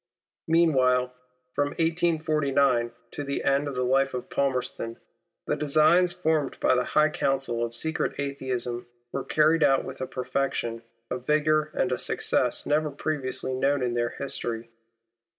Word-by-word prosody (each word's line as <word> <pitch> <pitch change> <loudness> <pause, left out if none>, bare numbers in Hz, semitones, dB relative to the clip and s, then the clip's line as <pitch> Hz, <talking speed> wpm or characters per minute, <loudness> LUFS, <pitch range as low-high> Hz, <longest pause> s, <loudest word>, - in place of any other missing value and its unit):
Meanwhile, 130 -7 +3 0.4
from 145 0 -1
1849 155 -7 +1 0.2
to 145 - -5
the 140 0 -3
end 140 +1 +2
of 140 - -4
the 125 - 0
life 135 +1 +2
of 125 - -6
Palmerston, 125 -4 -2 0.5
the - - 0
designs 155 +4 +4
formed 155 -5 -1
by - - +3
the 125 0 +2
high 155 0 +6
council 135 -5 -1
of 115 0 -4
secret 160 +4 -1
Atheism, 125 -4 -3 0.2
were 135 - -3
carried 155 +2 +3
out 135 -2 +4
with 130 0 -8
a 130 - -2
perfection, 125 -3 -2 0.3
a 125 - -1
vigour, 155 +3 +2
and - - +1
a - - 0
success - - 0
never 150 +1 +1
previously 140 -3 -2
known 135 +1 +1
in 120 -1 0
their 120 0 0
history. 120 -4 -5
140 Hz, 150 wpm, -26 LUFS, 125-155 Hz, 0.5 s, high